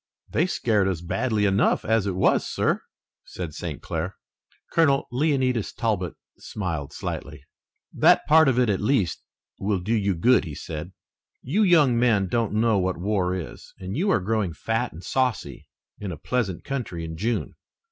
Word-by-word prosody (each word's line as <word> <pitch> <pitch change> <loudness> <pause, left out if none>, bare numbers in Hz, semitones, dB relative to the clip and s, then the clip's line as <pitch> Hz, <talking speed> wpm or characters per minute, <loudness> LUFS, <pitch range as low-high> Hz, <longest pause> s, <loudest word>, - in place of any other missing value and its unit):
"They 170 - +2
scared 105 - +1
us 95 -4 -1
badly 105 +5 0
enough 100 0 +2
as 110 -2 +2
it 95 - -1
was, 95 - +3
sir," - - 0 0.4
said 85 -4 -7
St. - - -6
Clair. - - -3 0.6
Colonel 140 -5 +3
Leonidas 130 -4 +1
Talbot 105 -8 -2 0.2
smiled 80 -9 -4
slightly. 70 0 -6 0.5
"That - - +4
part 160 0 +6
of 130 -2 +2
it 125 -1 +3
at 100 -3 0
least 105 -5 +1 0.4
will 100 -1 0
do 100 +6 -2
you 100 -4 +1
good," 125 +10 +4
he 80 -6 -7
said. 80 +5 -6 0.5
"You 170 - +1
young 155 - +5
men 110 -6 +3
don't 115 +1 0
know 110 -1 +3
what 95 -1 -1
war 95 -1 0
is, 90 -5 -8
and 95 +1 -6
you 185 +8 +1
are 155 - +3
growing 100 -2 -1
fat 115 +8 -2
and 85 +3 -11
saucy 120 - -2 0.3
in 100 -3 -4
a 80 - -6
pleasant 95 +3 -2
country 115 -12 -4
in 80 0 -6
June. 110 +8 -2
105 Hz, 165 wpm, -25 LUFS, 90-125 Hz, 0.6 s, part